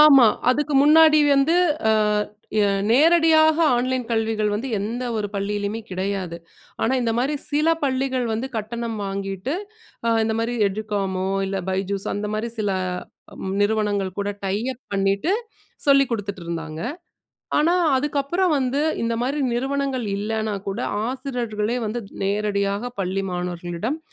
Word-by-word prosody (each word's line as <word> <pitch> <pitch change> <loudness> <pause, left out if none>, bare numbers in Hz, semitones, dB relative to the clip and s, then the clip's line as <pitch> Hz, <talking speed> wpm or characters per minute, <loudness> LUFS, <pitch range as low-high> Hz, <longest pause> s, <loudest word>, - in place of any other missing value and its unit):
ஆமா. 285 -4 +9 0.3
அதுக்கு 295 +3 0
முன்னாடி 310 +1 +7 0.2
வந்து 275 +5 +3 0.4
அ - - +5 0.6
ய - - +4 0.3
நேரடியாக 315 +3 +5 0.2
ஆன்லைன் 255 +1 0
கல்விகள் 220 -2 +1
வந்து 230 +6 -3
எந்த 230 +5 -3
ஒரு 210 -1 -1
பள்ளியிலயுமே 205 +2 -2
கிடையாது. 185 -2 -3 0.5
ஆனா 225 - +2
இந்த 230 -1 +1
மாரி 270 +5 +1 0.2
சில 300 +2 +2
பள்ளிகள் 260 -2 0
வந்து 225 +4 -2
கட்டணம் 225 +1 -3
வாங்கிட்டு, 195 - -3 0.5
அ - - +2 0.2
இந்த 220 0 0
மாரி 230 +1 -1
"எடு 200 +2 -2
காமோ" 190 -2 -1 0.2
இல்ல 195 0 -2
"பைஜூஸ்" 195 +1 -2
அந்த 205 +1 -2
மாரி 220 +2 -2
சில 205 -2 0 0.9
நிறுவனங்கள் 205 -3 +1
கூட 200 - -2 0.2
டை 190 0 0 0.2
அப் 255 - -18
பண்ணிட்டு 195 - +1 0.5
சொல்லிக் 275 -2 +5
குடுத்துட்டுருந்தாங்க. 170 -7 -4 0.8
ஆனா 325 +4 +3 0.2
அதுக்கப்பறம் 295 +6 +1
வந்து 265 +2 0 0.2
இந்த 230 0 0
மாரி 275 +4 -1
நிறுவனங்கள் 270 -1 -1
இல்லன்னா 215 +1 -2
கூட, 195 - -3 0.3
ஆசிரியர்களே 245 -4 -2
வந்து 225 +3 -3 0.2
நேரடியாக 200 +2 0
பள்ளி 195 +1 -1
மாணவர்களிடம் 180 - -3
225 Hz, 130 wpm, -23 LUFS, 200-270 Hz, 0.9 s, ஆமா